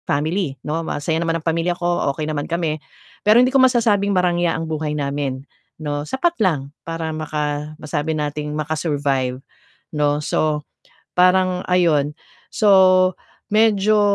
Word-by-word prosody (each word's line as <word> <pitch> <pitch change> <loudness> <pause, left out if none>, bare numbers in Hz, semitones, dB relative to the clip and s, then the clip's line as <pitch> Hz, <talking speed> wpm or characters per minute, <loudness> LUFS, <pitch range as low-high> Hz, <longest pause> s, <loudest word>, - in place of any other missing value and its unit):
Family, 155 0 -1
'no, 155 +2 -1
masaya 160 0 -2
naman 165 -1 0
ang 160 - -11
pamilya 170 +1 0
ko, 175 -4 0
okey 155 +2 -4
naman 150 -2 -3
kami. 165 -3 -1 0.4
Pero 215 +2 +5
hindi 250 +2 +4
ko 270 - +5
masasabing 230 -6 +3
marangya 175 -2 +1
ang 165 - -3
buhay 155 -1 -3
namin, 140 -2 -3 0.3
'no. 145 -2 -3
Sapat 335 +6 +1
lang 145 -8 0
para 165 -1 -4
maka 150 -1 -3
masabi 155 0 -3
nating 150 0 -3
maka-survive, 145 -4 -1 0.6
'no. 145 0 +1
So 150 0 -1 0.5
parang 180 0 +3
ayun. 160 -5 +2 0.4
So 185 -3 +5 0.3
medyo, 215 -1 +3
160 Hz, 135 wpm, -20 LUFS, 150-185 Hz, 0.6 s, Pero